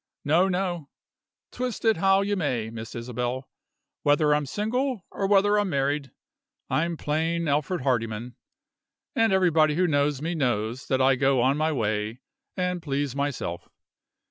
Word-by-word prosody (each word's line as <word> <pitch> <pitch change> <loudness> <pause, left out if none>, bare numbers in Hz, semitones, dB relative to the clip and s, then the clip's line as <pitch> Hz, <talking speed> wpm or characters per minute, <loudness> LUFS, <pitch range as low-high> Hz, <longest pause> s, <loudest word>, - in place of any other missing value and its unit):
No, 165 +6 +4
no. 180 -5 -2 0.6
Twist 250 -2 -4
it 220 -5 +4
how 195 +2 +4
you 205 +1 0
may, 125 - -1
Miss 110 -1 -8
Isabel, 125 +2 -3 0.5
whether 150 +1 +3
I'm 150 -1 0
single 225 - -2
or 195 - -1
whether 205 +1 +4
I'm 205 -2 0
married, 140 -1 0 0.6
I'm 170 +1 0
plain 165 +3 -1
Alfred 150 +4 0
Hardyman; 120 -2 -1 0.8
and 225 -1 +3
everybody 165 -5 +3
who 180 +2 +2
knows 145 -3 +1
me 165 +4 -2
knows 120 -4 -1
that 130 -1 +2
I 135 0 +5
go 135 -1 +3
on 130 +3 +3
my 155 +1 +1
way, 110 -2 -2 0.4
and 180 -1 -1
please 140 -3 -2
myself. 140 -11 -3
150 Hz, 145 wpm, -26 LUFS, 130-180 Hz, 0.8 s, I